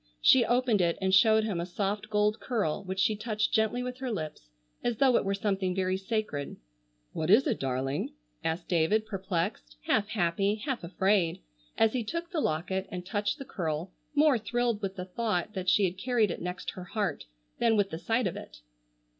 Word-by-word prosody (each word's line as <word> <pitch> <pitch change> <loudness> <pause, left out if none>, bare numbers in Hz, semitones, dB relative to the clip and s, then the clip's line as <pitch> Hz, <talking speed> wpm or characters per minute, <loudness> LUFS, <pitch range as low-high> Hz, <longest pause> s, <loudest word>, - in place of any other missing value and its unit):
She 245 - +6
opened 240 -3 +2
it 170 -1 +1
and 190 0 0
showed 220 +3 +6
him 205 -5 -2
a - - -2
soft 205 +3 -2
gold 210 0 +2
curl 210 - -1
which 190 0 -4
she 215 +2 +3
touched 215 0 -1
gently 220 +3 +2
with 250 0 -5
her 260 -2 -3
lips, 155 - -5 0.3
as 240 -2 0
though 260 -1 +4
it - - +3
were 195 0 0
something 195 -2 -1
very 185 -1 +1
sacred. 190 -7 -3 0.6
"What 160 +1 -2
is 220 +8 +6
it, 250 -8 0
darling?" 135 +1 -2 0.3
asked 165 +2 -2
David 180 +6 +2
perplexed, 180 - -3
half 205 - +2
happy, 195 +1 +1
half 250 0 -4
afraid 185 - +1 0.3
as 225 -1 +4
he 250 -3 0
took 335 - -4
the 330 -5 0
locket 190 - -1
and 180 -1 -6
touched 205 +6 -1
the 275 - -8
curl 165 -2 -3 0.2
more 295 -4 +5
thrilled 235 0 0
with 195 -1 -3
the 180 - -5
thought 210 -1 -2
that 185 -3 -1
she 205 - +4
had 185 +1 -3
carried 230 -4 +2
it - - -5
next 180 +1 -4
her 185 - -8
heart 195 -5 -2 0.3
than 230 -2 +3
with 200 -1 +1
the 160 - -4
sight 225 +5 0
of 185 - -1
it. - - -10
200 Hz, 195 wpm, -29 LUFS, 180-225 Hz, 0.6 s, She